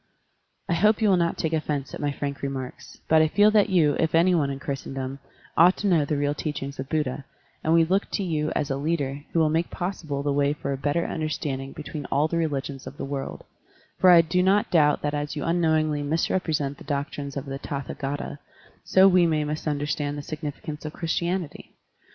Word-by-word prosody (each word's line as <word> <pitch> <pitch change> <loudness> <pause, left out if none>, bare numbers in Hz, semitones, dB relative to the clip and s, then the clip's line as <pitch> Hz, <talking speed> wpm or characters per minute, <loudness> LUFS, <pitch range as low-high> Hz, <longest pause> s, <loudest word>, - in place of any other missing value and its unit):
I - - +1
hope 210 +6 +3
you 215 -2 +3
will 190 - +5
not 170 -1 0
take 160 0 -1
offense 150 -3 -2
at - - -6
my 145 -1 0
frank 140 0 -4
remarks, 135 -2 -6
but 160 0 +5
I 155 - +4
feel 205 +6 +4
that 210 -1 +4
you, 160 -6 +3
if 160 0 +1
any 175 +3 +5
one 150 -5 +2
in 135 - -3
Chris 135 0 -4
tendom, 135 0 -5 0.4
ought 175 +3 +6
to 205 - -1
know 165 -6 +3
the 145 +1 -1
real 145 0 +1
teachings 145 -2 -5
of 135 0 -5
Buddha, 150 -3 -1 0.4
and 160 - +1
we 165 0 +6
look 190 +4 0
to 200 - 0
you 155 -4 -1
as 140 - -1
a 135 - 0
leader 145 -2 -2
who - - -2
will 155 -2 +3
make 165 +2 0
possible 160 -6 -4
the 145 -1 0
way 140 0 +2
for 145 -2 -4
a - - -1
better 145 +5 0
understanding 145 -4 -3
between 150 -2 -7
all 145 +3 +1
the 170 - -2
religions 140 -4 -2
of 140 - -9
the - - -4
world, 135 -1 -5 0.6
for 185 - +6
I 175 -2 +9
do 170 +3 0
not 195 +3 +2
doubt 150 -4 +3
that 145 0 -1
as 145 0 -3
you 145 - -3
unknowingly 160 -3 +1
misrepresent 155 -2 -1
the - - -11
doctrines 140 -1 -4
of 140 - -4
the 135 0 -5
Tathdgata, 140 0 -5 0.4
so 190 +1 +6
we 180 -2 +5
may 155 -2 +1
mis 150 +1 -3
tinderstand 145 -1 -1
the 145 - -6
significance 150 0 -6
of 155 0 -6
Christianity. 170 0 -3
150 Hz, 215 wpm, -25 LUFS, 140-165 Hz, 0.6 s, I